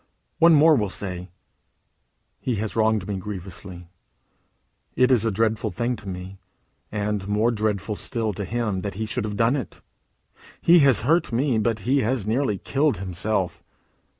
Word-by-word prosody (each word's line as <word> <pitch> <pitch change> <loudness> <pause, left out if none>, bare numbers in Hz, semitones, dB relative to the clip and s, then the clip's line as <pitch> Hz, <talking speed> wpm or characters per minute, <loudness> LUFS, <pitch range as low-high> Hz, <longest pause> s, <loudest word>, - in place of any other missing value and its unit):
One 165 0 +7
more 155 +1 +6
will 105 -6 0
say: 90 -1 -5 1.1
"He 125 - -1
has 110 +1 -3
wronged 110 -3 +2
me 100 -2 -2
grievously. 95 -2 -8 1.1
It 125 +1 +4
is 115 -4 +4
a - - +2
dreadful 110 +2 0
thing 120 +1 -2
to 100 - -8
me, 95 +1 -7 0.5
and 105 -2 -2
more 105 +3 +2
dreadful 105 -1 -1
still 110 0 -2
to 100 - -4
him, 110 -2 -2
that 100 +1 -5
he 110 +2 -3
should 110 - -2
have 105 -1 -4
done 115 +4 +3
it. 135 -6 -6 0.8
He 170 +1 +6
has 135 -7 +4
hurt 160 +8 +2
me, 120 0 +1
but 110 0 0
he 135 +3 +3
has 120 -3 0
nearly 110 -1 0
killed 140 +2 0
himself. 95 +1 -2
110 Hz, 160 wpm, -24 LUFS, 100-120 Hz, 1.1 s, One